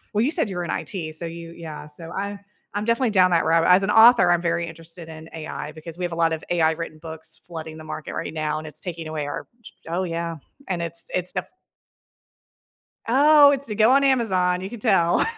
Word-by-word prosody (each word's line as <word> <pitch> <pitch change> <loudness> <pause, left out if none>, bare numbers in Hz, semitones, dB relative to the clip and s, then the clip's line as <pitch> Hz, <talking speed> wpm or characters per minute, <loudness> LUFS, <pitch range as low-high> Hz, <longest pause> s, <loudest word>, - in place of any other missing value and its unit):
Well, 215 - +3
you 275 - +1
said 320 - +1
you 190 - -5
were 175 - -2
in 170 - -3
IT. 160 -6 -4
So 170 - -3
you 165 0 -8
yeah, 160 -3 -8
so 165 +2 -11
I 200 +3 -4 0.3
I'm 205 +1 -2
definitely 235 +2 +2
down 185 -3 +4
that 170 -1 +3
rabbit 165 +1 +3
As 180 +2 +6
an 195 - 0
author, 225 -4 +7
I'm 175 -1 +3
very 170 0 0
interested 165 0 -10
in 160 0 -10
AI 155 -1 -6
because 160 +1 -9
we 180 - -2
have 175 - -4
a - - -3
lot 165 -1 +2
of 160 -1 -2
AI 165 -2 +3
written 160 -1 -6
books 160 0 -9
flooding 160 -2 -8
the 160 - -10
market 155 -1 -6
right - - -4
now, 155 -1 -1
and 155 - -6
it's 155 - -9
taking 170 -3 -6
away 155 -2 -3
our - - -5 0.2
j 225 - -12 0.2
Oh 175 +3 -1
yeah. 170 -1 -3 0.4
And 170 - -3
it’s 170 0 -6 0.2
it’s 180 0 -5
def - - -2 1.6
Oh, 285 +4 +7
it's 280 -2 -2
a 210 - -3
go 220 +3 +5
on 275 +1 +5
Amazon, 190 -9 +2
you 190 - -5
can 235 +1 -8
tell. 190 -6 +3
170 Hz, 235 wpm, -23 LUFS, 160-205 Hz, 1.6 s, author